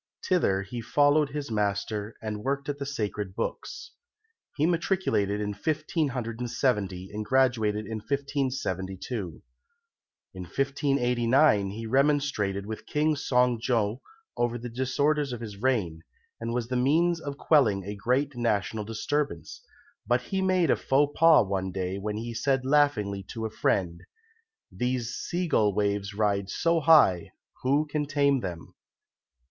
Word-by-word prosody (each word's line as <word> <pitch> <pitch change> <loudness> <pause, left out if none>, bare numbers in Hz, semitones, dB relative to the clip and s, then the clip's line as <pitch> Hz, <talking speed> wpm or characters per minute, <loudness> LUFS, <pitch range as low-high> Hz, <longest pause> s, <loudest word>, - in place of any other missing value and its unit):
Thither 100 - +2
he 115 +4 -6
followed 145 +4 +3
his 140 -3 -5
master 105 0 -2
and 105 -1 -4
worked 140 +1 -2
at 145 -1 -3
the 140 - -4
Sacred 105 -7 -3
Books. 440 - -5 0.7
He 150 - +2
matriculated 165 - 0
in 105 -1 -2
1570 120 - -2
and 105 +1 -3
graduated 110 -4 +1
in 110 -1 -5
1572. 120 - -3 0.9
In 95 - -8
1589 125 - +2
he 110 +3 -6
remonstrated 130 -7 +1
with 110 +1 -7
King 155 +1 +1
Son 125 -4 +2
jo 115 -1 0 0.3
over 120 0 0
the 120 +1 -7
disorders 140 +4 0
of 120 - -5
his 105 -4 -7
reign, 105 -12 0 0.4
and 115 0 -3
was 120 -1 -2
the 130 - -1
means 165 +7 +2
of 140 -2 -6
quelling 115 -13 +3
a 100 +2 -5
great 130 +7 0
national 110 -2 -1
disturbance; 140 +7 -3 0.5
but 120 +1 +2
he 190 +6 -2
made 185 -5 +2
a - - +4
faux 145 +2 +1
pas 165 -7 +6
one 95 -1 -2
day 95 +1 -3
when 105 +1 -3
he 115 +1 -5
said 135 +2 0
laughingly 130 -9 +2
to 110 +4 -6
a 110 - -4
friend 90 -5 0 0.7
"These 125 -1 -2
sea 180 0 -3
gull 105 - +2
waves 100 -1 -1
ride 100 -2 0
so 165 +9 +1
high, 150 - +5 0.3
Who 140 +4 +2
can 150 -1 -2
tame 140 -2 +2
them?" 90 -6 -7
120 Hz, 140 wpm, -27 LUFS, 105-140 Hz, 0.9 s, pas